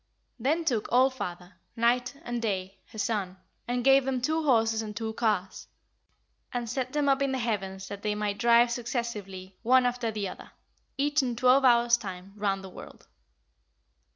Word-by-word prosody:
Then 310 +8 0
took 240 -8 -1
All 255 +3 +5
father, 180 -7 -7 0.2
Night, 245 +3 +1
and 240 -1 -3
Day, 195 -3 -3
her - - -13
son, 200 -3 -2 0.3
and 245 0 -1
gave 270 +1 +6
them 260 -1 -1
two 315 +6 0
horses 225 -5 +2
and 210 -1 -7
two 220 -1 -3
cars, 210 -5 -1 0.8
and 240 -1 -3
set 255 +2 -3
them 295 -1 +1
up 275 0 +3
in 275 -1 +1
the - - 0
heavens 195 -5 -3
that 200 0 -7
they 210 0 -1
might 210 -1 -2
drive 235 0 +5
successively 210 -6 -5
one 255 +2 +4
after 245 -1 -1
the 210 -2 -3
other, - - -10 0.4
each 290 +2 +2
in 245 -3 -2
twelve 255 +3 +4
hours' 240 -1 +5
time, 190 -3 -8
round 200 -2 -1
the 190 - -8
world. - - -12
235 Hz, 175 wpm, -28 LUFS, 205-255 Hz, 0.8 s, gave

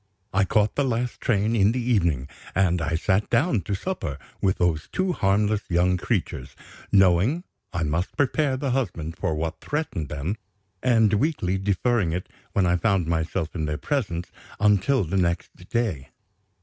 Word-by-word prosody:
I 95 +1 +3
caught 105 +2 +2
the 145 - +1
last 125 -1 -1
train 110 -1 +1
in 105 0 +4
the 130 - -1
evening; 85 - +1 0.3
and 90 -3 +2
I 80 +1 0
sat 95 +4 +1
down 140 - +2
to 100 +3 -2
supper 95 - -3 0.2
with 95 -1 +2
those 85 -3 0
two 185 0 0
harmless 105 - +2
young 90 +1 +3
creatures, 90 - -2 0.4
knowing 95 - +4 0.3
I 90 -3 -1
must 80 +4 -2
prepare 140 -1 +1
the 135 -1 -1
husband 85 - -2
for 80 - -1
what 80 +2 -3
threatened 145 - -3
them, 75 +9 -3 0.4
and 115 -5 +4
weakly 100 - +1
deferring 100 -1 +1
it, 90 +1 -4 0.2
when 95 - +3
I 90 0 +3
found 95 -3 +2
myself 80 0 -1
in 80 -3 -2
their 75 0 -2
presence, 100 - -2 0.3
until 105 +5 +3
the 90 +3 -2
next 85 -2 0
day. 105 - -1
95 Hz, 160 wpm, -25 LUFS, 85-115 Hz, 0.4 s, in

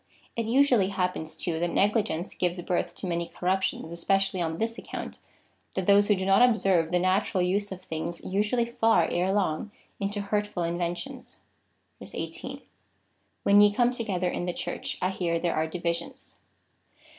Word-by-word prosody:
It 230 -1 -2
usually 245 -5 +4
happens, 180 -5 -2
too, 165 -2 -2
that 175 +1 0
negligence 205 -4 +1
gives 180 0 -1
birth 180 - -1
to - - -6
many 170 -1 -1
corrup 185 +2 0
tions, 165 -3 -2
especially 195 +2 +1
on 160 -1 -1
this 230 +3 -2
account, - - -7 0.6
that 190 - -1
those 205 +1 +5
who 210 - +4
do 190 0 -3
not 195 +4 +5
ob 245 -3 +6
serve 180 -6 +2
the 180 - +3
natural 185 +1 +1
use 200 +3 0
of 185 -1 -7
things 165 0 -4
usually 210 +5 +1
fall 225 -1 +3
erelong 185 0 0 0.3
into 200 0 -2
hurt 205 +1 0
ful 180 -4 -3
inventions.^ 175 +10 -4 0.8
18. - - -5 0.8
When 200 +1 +6
ye 205 0 +6
come 240 +3 +3
together 200 -7 -2
in 175 - -2
the 175 - -2
Church, - - -4
I 185 - +2
hear 170 -3 -1
there 170 0 0
are 160 +1 +1
divisions. 170 0 -4
190 Hz, 170 wpm, -27 LUFS, 175-205 Hz, 0.8 s, ob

